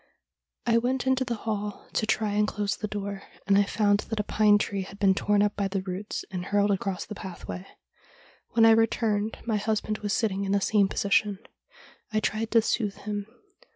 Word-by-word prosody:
' - - -55
I 230 -1 +4
went 250 +2 -1
into 260 0 +2
the 240 -2 -2
hall 210 -2 -3
to 215 - 0
try 215 -2 +1
and 210 +1 +2
close 205 -1 -1
the 215 - -4
door, 200 -1 -4 0.2
and 200 - +4
I 200 0 +5
found 205 0 +2
that 225 -1 -2
a - - +1
pine 210 0 +4
tree 200 -1 -2
had 195 +1 -9
been 195 -2 +4
torn 205 +1 +2
up 210 0 0
by 200 -1 0
the 195 -1 -2
roots, 190 +2 -5
and 180 -1 -4
hurled 205 +1 +2
across 195 -1 -2
the - - -7
pathway. 170 - -7 0.9
When 225 0 +6
I 225 - +8
returned 220 -1 +2
my 225 -3 +1
husband 215 0 -1
was 205 -1 -3
sit 225 - +2
ting 195 0 -3
in 195 0 -1
the 200 - +3
same 200 0 +3
position. 200 +1 +1 0.7
I 215 - +2
tried 220 +1 -1
to 230 -1 +4
soothe 210 -3 0
him. 205 -1 -3
205 Hz, 210 wpm, -27 LUFS, 200-220 Hz, 0.9 s, I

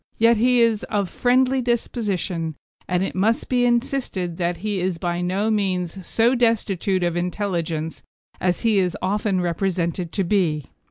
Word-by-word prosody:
Yet 230 +1 +5
he 245 +2 +4
is 230 -2 +3
of 200 -4 -1
friendly 255 +1 +2
disposition, 200 -9 -2 0.3
and 180 0 +1
it - - -3
must 215 +5 +1
be 245 -1 +2
insisted 240 -8 -1
that 175 -1 -1
he 205 -3 -1
is 180 -1 -1
by 175 +1 -2
no 195 +5 0
means 185 -3 -1
so 230 +2 +3
destitute 205 -6 +1
of 175 -1 0
intelligence 175 -3 -2 0.4
as 180 -1 0
he 220 -4 +3
is 180 -2 0
often 195 0 0
represented 175 -1 -1
to 195 - +1
be. 170 -7 +1
190 Hz, 155 wpm, -22 LUFS, 175-225 Hz, 0.4 s, Yet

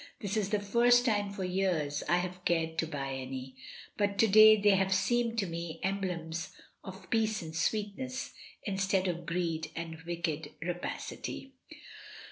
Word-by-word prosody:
"This 205 +1 -3
is 205 -3 0
the 210 -1 +1
first 240 +4 +4
time 205 -4 +1
for 200 -1 -5
years 180 -6 0
I 175 - +4
have 180 0 -4
cared 165 -2 0
to 165 - +1
buy 140 -3 -4
any; 130 0 -6 0.4
but 200 -1 0
to 225 - +5
day 215 +1 +9
they 205 0 +5
have 190 0 +2
seemed 230 +5 +1
to 205 - +1
me 170 -1 -5
emblems 180 -4 -3 0.3
of 190 +1 -10
peace 220 -3 +1
and 160 0 -8
sweetness, 220 +8 -2 0.3
instead 195 -1 0
of 175 -1 -3
greed 165 -2 -1
and 165 -1 -6
wicked 160 -3 -3
rapacity." 180 +9 -5
185 Hz, 155 wpm, -31 LUFS, 165-205 Hz, 0.4 s, day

